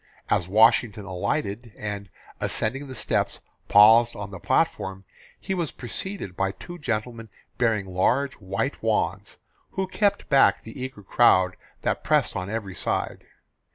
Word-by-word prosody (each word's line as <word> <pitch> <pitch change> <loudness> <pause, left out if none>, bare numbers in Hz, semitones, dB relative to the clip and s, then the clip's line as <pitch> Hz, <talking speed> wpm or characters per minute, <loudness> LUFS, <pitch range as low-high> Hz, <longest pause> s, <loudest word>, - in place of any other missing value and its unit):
As 90 - +2
Washington 110 0 +4
alighted 100 +4 -3
and, 100 -2 -5 0.3
ascending 135 +6 -2
the 130 - -8
steps, - - 0 0.3
paused 115 +3 +7
on 100 -1 -6
the 95 - -8
platform, 95 +3 0 0.3
he 195 - -3
was 170 -5 -2
preceded 130 - -5
by 95 +1 0
two 175 0 -10
gentleman 115 -3 -3 0.3
bearing 115 -4 +2
large 120 +9 +1
white 95 0 -3
wands, - - -1 0.4
who 190 - -1
kept 200 +2 0
back 135 -2 +4
the 115 +4 -9
eager 130 -5 -6
crowd 95 -4 +4 0.3
that - - -1
pressed - - +2
on 90 +1 -3
every 105 -3 -4
side. - - -3
110 Hz, 140 wpm, -25 LUFS, 100-130 Hz, 0.4 s, paused